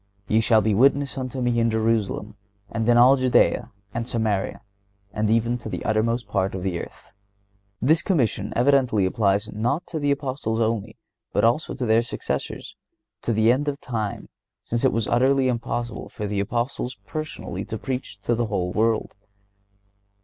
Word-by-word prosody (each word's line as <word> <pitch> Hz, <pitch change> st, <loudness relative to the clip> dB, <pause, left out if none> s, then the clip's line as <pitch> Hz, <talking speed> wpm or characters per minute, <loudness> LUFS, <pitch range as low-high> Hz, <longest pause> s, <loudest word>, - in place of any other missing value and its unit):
(119) 105 Hz, -, -1 dB
"Ye 110 Hz, -, +5 dB
shall 110 Hz, 0 st, +4 dB
be 105 Hz, 0 st, +1 dB
witnesses 135 Hz, +5 st, +3 dB
unto 130 Hz, 0 st, -4 dB
Me 120 Hz, -1 st, +1 dB
in 115 Hz, 0 st, +3 dB
Jerusalem, 110 Hz, -1 st, 0 dB, 0.4 s
and 115 Hz, 0 st, -1 dB
in 120 Hz, -, +6 dB
all 130 Hz, +3 st, +7 dB
Judea, 130 Hz, -1 st, +3 dB, 0.2 s
and 115 Hz, +1 st, -3 dB
Samaria, 110 Hz, -4 st, -1 dB, 0.5 s
and 105 Hz, 0 st, 0 dB
even 115 Hz, +2 st, +2 dB
to 115 Hz, -, -7 dB
the -, -, -5 dB
uttermost 115 Hz, +1 st, +1 dB
part 95 Hz, -1 st, -1 dB
of 90 Hz, -, -4 dB
the 90 Hz, -3 st, -1 dB
earth."(120) 100 Hz, +2 st, -11 dB
This 160 Hz, +2 st, +5 dB
commission 145 Hz, -, 0 dB
evidently 125 Hz, -5 st, +3 dB
applies 100 Hz, +1 st, +1 dB
not 120 Hz, -, -1 dB
to 160 Hz, -, -4 dB
the 145 Hz, -1 st, 0 dB
Apostles 130 Hz, -5 st, -1 dB
only, 110 Hz, -1 st, -1 dB, 0.4 s
but -, -, +2 dB
also 120 Hz, +7 st, +2 dB
to 130 Hz, -, -2 dB
their 110 Hz, 0 st, +4 dB
successors, 120 Hz, -, -4 dB, 0.5 s
to -, -, -1 dB
the 110 Hz, +1 st, +4 dB
end 140 Hz, +4 st, 0 dB
of 145 Hz, 0 st, -2 dB
time, 110 Hz, -7 st, -4 dB, 0.4 s
since 120 Hz, +2 st, -2 dB
it 130 Hz, -, +4 dB
was 115 Hz, -2 st, -1 dB
utterly 130 Hz, +2 st, +3 dB
impossible 120 Hz, -1 st, -3 dB
for 105 Hz, -, -5 dB
the 100 Hz, -1 st, -2 dB
Apostles 120 Hz, +4 st, -2 dB
personally 155 Hz, -, -5 dB
to 110 Hz, -, -5 dB
preach 125 Hz, -3 st, -5 dB
to 120 Hz, -, 0 dB
the 115 Hz, 0 st, 0 dB
whole 90 Hz, -4 st, -2 dB
world. 110 Hz, 0 st, +1 dB
115 Hz, 170 wpm, -24 LUFS, 105-125 Hz, 0.5 s, all